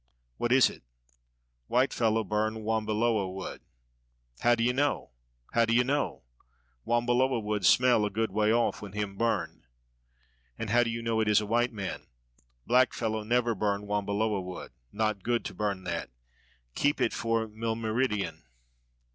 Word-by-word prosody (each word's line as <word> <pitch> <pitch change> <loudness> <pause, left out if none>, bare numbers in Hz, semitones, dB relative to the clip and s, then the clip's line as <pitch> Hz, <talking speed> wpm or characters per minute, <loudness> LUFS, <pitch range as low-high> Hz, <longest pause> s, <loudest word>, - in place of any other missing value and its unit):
"What 120 - -1
is 130 -1 +6
it?" - - -9 0.9
"White 130 +2 +2
fellow 115 -1 +1
burn 110 +2 -1
wambiloa 110 -2 0
wood." 95 0 -7 0.8
"How 120 0 +4
d'ye 120 +1 +2
know? 140 - 0 0.4
how 115 0 +4
d'ye 115 +2 +3
know?" 140 +3 -1 0.6
"Wambiloa 120 +2 +2
wood 105 -1 -2
smell 125 -3 +5
a 105 - +1
good 110 +1 -1
way 105 +2 +2
off 120 +1 +1
when 100 -2 -8
him 105 -1 -3
burn." 115 +2 -1 0.9
"And 110 - -4
how 120 +1 +5
do 120 - +1
you 115 0 -4
know 115 -1 0
it 110 - +1
is 105 - +5
a 105 - -3
white 120 +3 +1
man?" 100 -4 -6 0.6
"Black 125 +1 +4
fellow 110 -2 -2
never 120 +2 +1
burn 105 0 -1
wambiloa 105 0 0
wood; 90 0 -8 0.2
not 110 -2 -1
good 120 +3 -1
to - - -5
burn 100 -3 -2
that. 85 -2 -3 0.6
Keep 145 - +1
it - - +1
for 115 -1 0
milmeridien." 110 - -2
110 Hz, 155 wpm, -29 LUFS, 105-120 Hz, 0.9 s, is